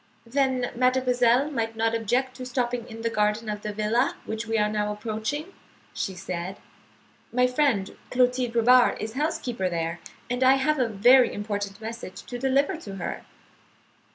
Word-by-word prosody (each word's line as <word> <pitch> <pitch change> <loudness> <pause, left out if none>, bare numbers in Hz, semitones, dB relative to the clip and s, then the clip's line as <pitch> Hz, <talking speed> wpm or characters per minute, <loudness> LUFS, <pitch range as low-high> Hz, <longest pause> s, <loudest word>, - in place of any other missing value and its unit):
"Then 260 0 0
mademoiselle 255 +1 +3
might 225 -4 -2
not 225 0 +1
object 245 +4 0
to 255 - -6
stopping 245 -1 -2
in 225 0 -8
the 230 - +1
garden 210 +1 0
of 210 0 -3
the 210 - -4
villa 215 +5 +1
which 220 +1 -4
we 225 0 0
are 210 -1 +3
now 210 0 -1
approaching," 220 - -4 0.4
she 190 - -3
said. 180 +1 -5 0.7
"My 250 +2 +3
friend, 250 -6 +1
Clotilde 250 -1 +1
Robard, 245 +2 +5
is 220 +1 -4
housekeeper 250 - -1
there, 165 0 -2 0.3
and 245 +1 -1
I 260 +1 +7
have 280 +2 +1
a 250 - +2
very 245 +5 +5
important 205 -1 -4
message 225 -3 -7
to 245 - -7
deliver 275 +6 +1
to 200 -11 -8
her." 180 - -4
235 Hz, 160 wpm, -26 LUFS, 210-255 Hz, 0.7 s, I